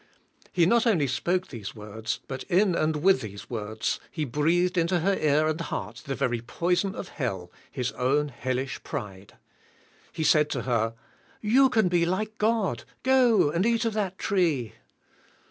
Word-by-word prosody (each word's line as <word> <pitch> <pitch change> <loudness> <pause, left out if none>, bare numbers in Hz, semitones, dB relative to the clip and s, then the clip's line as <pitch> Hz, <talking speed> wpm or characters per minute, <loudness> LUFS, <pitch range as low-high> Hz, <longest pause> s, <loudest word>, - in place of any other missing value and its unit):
He 175 -2 +3
not 235 +6 +3
only 175 -11 +3
spoke 175 +8 -1
these 110 -7 -7
words, 110 +1 -5
but 130 -1 -5
"in 190 +1 +3
and 155 -2 0
with 195 +1 +5
these 100 -1 -9
words 110 -1 -2
he 155 -2 -3
breathed 165 +7 +1
into 175 0 +1
her 195 +4 +2
ear 155 -1 +2
and 155 +2 -1
heart 115 -7 -5
the 135 - -2
very 120 -2 -1
poison 175 - -1
of 180 - -6
hell,. 95 - -4 0.2
his 125 -3 -2
own 145 +4 +1
hellish 130 +1 -3
pride. 100 -1 -7 0.8
He 160 - -3
said 150 -1 +4
to 125 -5 -2
her, 115 -2 0 0.4
"You 260 +5 +4
can 220 -6 +3
be 175 -1 +2
like 215 +4 -2
God, 220 -2 +1 0.2
go 250 - +4
and 170 +4 +1
eat 230 +1 +2
of 225 - 0
that 195 -3 -2
tree." 160 - 0
155 Hz, 165 wpm, -27 LUFS, 125-190 Hz, 0.8 s, with